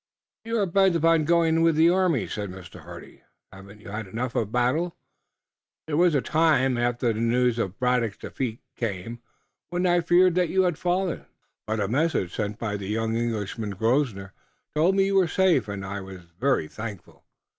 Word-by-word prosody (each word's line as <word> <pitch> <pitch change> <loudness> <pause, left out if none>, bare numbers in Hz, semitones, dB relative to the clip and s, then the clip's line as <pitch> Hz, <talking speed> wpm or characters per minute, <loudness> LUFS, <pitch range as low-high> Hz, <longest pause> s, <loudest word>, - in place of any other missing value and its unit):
"You 230 0 -1
are 205 - +2
bent 190 0 +3
upon 165 -1 +3
going 165 0 +3
with 165 -1 +3
the 165 +2 +5
army?" 180 -8 +1
said 105 -2 -5
Mr. 90 -1 -11
Hardy. - - -12 0.3
"Haven't 100 +2 -13
you 105 - -11
had 105 0 -5
enough 120 +5 -4
of 110 -2 -1
battle? 130 +9 0 0.9
There 155 - -3
was 170 0 +4
a 140 - +2
time, 155 -5 +2
after 120 -1 0
the 110 - -5
news 120 0 +1
of 95 -3 -3
Braddock's 125 -4 0
defeat 120 -4 -5
came, 115 +1 -4 0.5
when 175 +1 -1
I 175 -1 +3
feared 175 +2 +4
that 180 -1 +1
you 190 0 +2
had 175 -4 0
fallen, 180 0 -1 0.4
but 110 0 -1
a 100 - 0
message 130 - 0
sent 105 -1 -3
by 105 -3 -3
the 100 -1 -7
young 110 +2 -1
Englishman, 110 -2 -3
Grosvenor, 110 -4 0 0.4
told 165 +5 +2
me 195 0 +3
you 195 0 0
were 185 -2 +4
safe, 170 - +2
and 100 -1 -5
I 100 +1 -5
was 95 -1 -10 0.2
very 130 - +1
thankful. 105 +1 -9
125 Hz, 185 wpm, -25 LUFS, 105-165 Hz, 0.9 s, the